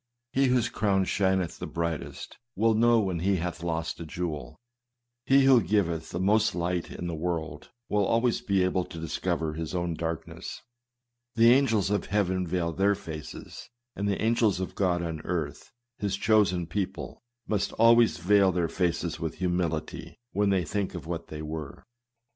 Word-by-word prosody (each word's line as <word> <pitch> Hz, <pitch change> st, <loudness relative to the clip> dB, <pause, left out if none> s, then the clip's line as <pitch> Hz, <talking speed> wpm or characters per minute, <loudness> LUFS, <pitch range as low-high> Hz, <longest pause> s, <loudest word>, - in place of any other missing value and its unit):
He 135 Hz, +1 st, +3 dB
whose 125 Hz, -2 st, +2 dB
crown 100 Hz, -5 st, +1 dB
shineth 95 Hz, -2 st, 0 dB
the -, -, -4 dB
brightest, 85 Hz, -2 st, -4 dB, 0.2 s
will 115 Hz, +3 st, +3 dB
know 115 Hz, +1 st, +4 dB
when 95 Hz, -5 st, -1 dB
he 95 Hz, +3 st, +2 dB
hath 85 Hz, -1 st, -3 dB
lost 80 Hz, -1 st, -3 dB
a -, -, -5 dB
jewel. 80 Hz, -3 st, -5 dB, 0.7 s
He 135 Hz, 0 st, +6 dB
who 135 Hz, -3 st, +6 dB
giveth 85 Hz, -4 st, 0 dB
the 85 Hz, -, -4 dB
most 105 Hz, +1 st, +3 dB
light 85 Hz, 0 st, -1 dB
to -, -, -10 dB
the 85 Hz, -1 st, -3 dB
world, 80 Hz, 0 st, -4 dB, 0.2 s
will 105 Hz, -1 st, +1 dB
always 115 Hz, +4 st, +1 dB
be 100 Hz, -2 st, +1 dB
able 90 Hz, 0 st, +1 dB
to -, -, -10 dB
discover 80 Hz, 0 st, -2 dB
his 80 Hz, +2 st, -5 dB
own 85 Hz, -1 st, -1 dB
darkness. 80 Hz, -1 st, -5 dB, 0.7 s
The 115 Hz, +1 st, +6 dB
angels 115 Hz, -7 st, +2 dB
of 105 Hz, -, 0 dB
heaven 95 Hz, -3 st, 0 dB
veil 85 Hz, -1 st, -1 dB
their 100 Hz, +4 st, +2 dB
faces; 80 Hz, -6 st, -9 dB, 0.3 s
and 100 Hz, +1 st, -2 dB
the 100 Hz, -, -1 dB
angels 110 Hz, -4 st, +2 dB
of 95 Hz, -, -4 dB
God 90 Hz, -3 st, +1 dB
on 80 Hz, -2 st, -4 dB
earth, 80 Hz, -4 st, -4 dB, 0.3 s
his 100 Hz, -3 st, -1 dB
chosen 100 Hz, -4 st, +3 dB
people, 95 Hz, +3 st, -4 dB, 0.3 s
must 105 Hz, -2 st, 0 dB
always 115 Hz, 0 st, +5 dB
veil 95 Hz, +2 st, +4 dB
their 85 Hz, -2 st, 0 dB
faces 85 Hz, -2 st, -1 dB
with 80 Hz, -1 st, -3 dB
humility, 90 Hz, -3 st, -2 dB, 0.2 s
when 100 Hz, 0 st, +1 dB
they 95 Hz, -3 st, +2 dB
think 100 Hz, -1 st, -2 dB
of 85 Hz, -, -6 dB
what 85 Hz, 0 st, -5 dB
they 75 Hz, 0 st, -7 dB
were. 75 Hz, -2 st, -6 dB
90 Hz, 170 wpm, -28 LUFS, 85-105 Hz, 0.7 s, He